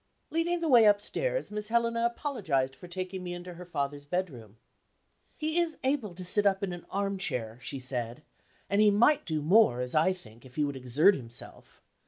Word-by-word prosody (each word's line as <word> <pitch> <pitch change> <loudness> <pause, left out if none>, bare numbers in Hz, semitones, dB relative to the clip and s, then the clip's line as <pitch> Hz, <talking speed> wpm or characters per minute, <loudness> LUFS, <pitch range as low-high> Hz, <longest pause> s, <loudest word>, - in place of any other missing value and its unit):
Leading 335 +2 0
the 330 - 0
way 240 -6 +7
upstairs, - - +1
Miss 210 0 -3
Helena 230 0 +1
apologized 185 - -1
for 180 - -12
taking 185 +1 -5
me 175 0 -4
into 175 0 -8
her 180 +1 -10
father's 145 -3 -3
bedroom. 130 - -4 0.8
"He 315 +1 0
is 335 -2 0
able 260 -9 -1
to 180 0 -7
sit 205 +3 +3
up 195 0 +1
in 185 -2 -2
an 175 - -9
armchair," 185 - -3
she 135 - -5
said; 125 +1 -4 0.4
"and 200 +1 +2
he 215 - +7
might 235 +9 +3
do 155 -3 -1
more, 175 - +5
as 125 0 -3
I 160 +4 +4
think, 120 -11 -11
if 130 -1 -15
he 150 - +1
would 140 -1 -2
exert 130 +9 +4
himself. 120 -6 -8
185 Hz, 190 wpm, -29 LUFS, 140-220 Hz, 0.8 s, way